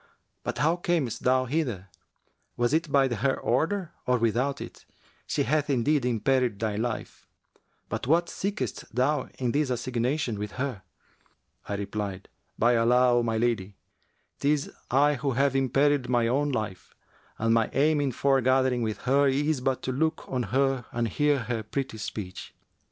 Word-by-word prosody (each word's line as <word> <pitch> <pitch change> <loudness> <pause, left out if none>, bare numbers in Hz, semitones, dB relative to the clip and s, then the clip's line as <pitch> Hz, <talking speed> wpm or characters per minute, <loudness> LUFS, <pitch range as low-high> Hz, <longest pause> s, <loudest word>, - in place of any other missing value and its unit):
But - - -3
how 160 +4 +2
camest 175 - -1
thou 130 0 +3
hither? 120 - -2 0.7
Was 120 +3 +1
it 160 -1 +1
by 135 -1 +4
her 130 +2 0
order 165 - 0 0.2
or 125 0 +3
without 125 +5 0
it? - - -9 0.4
She - - 0
hath 150 +3 0
indeed 140 +2 +2
imperilled 125 -1 +1
thy 110 -1 -2
life[FN#361]. 115 +2 -4 0.6
But - - -4
what 170 +4 +3
seekest 200 - -4
thou 130 +2 +1
in 125 -2 0
this 145 0 +1
assignation 125 0 -1
with 105 -1 -5
her?' 130 -6 -3 0.9
I 100 - -1
replied, 100 -1 -4 0.3
'By 120 +1 +4
Allah, 125 +2 +4
O - - +2
my 115 -1 -1
lady, 110 -4 -1 0.6
'tis 145 0 +1 0.2
I 145 +3 +4
who 135 +1 -1
have 135 +2 +2
imperilled 135 0 +2
my 120 -2 +2
own 140 +5 +1
life, 105 -7 -4 0.4
and 115 +1 +2
my 115 -1 +2
aim 150 +2 +2
in 140 -2 0
foregathering 130 -1 +2
with 110 -2 -2
her 140 +3 +3
is 145 +1 +1
but 130 0 -1
to 130 - -1
look 160 +5 -1
on 130 -1 -1
her 135 0 +1
and 115 -1 -1
hear 145 +4 +2
her 115 0 -2
pretty 110 +1 -4
speech.' 100 -3 -6
130 Hz, 160 wpm, -27 LUFS, 115-140 Hz, 0.9 s, by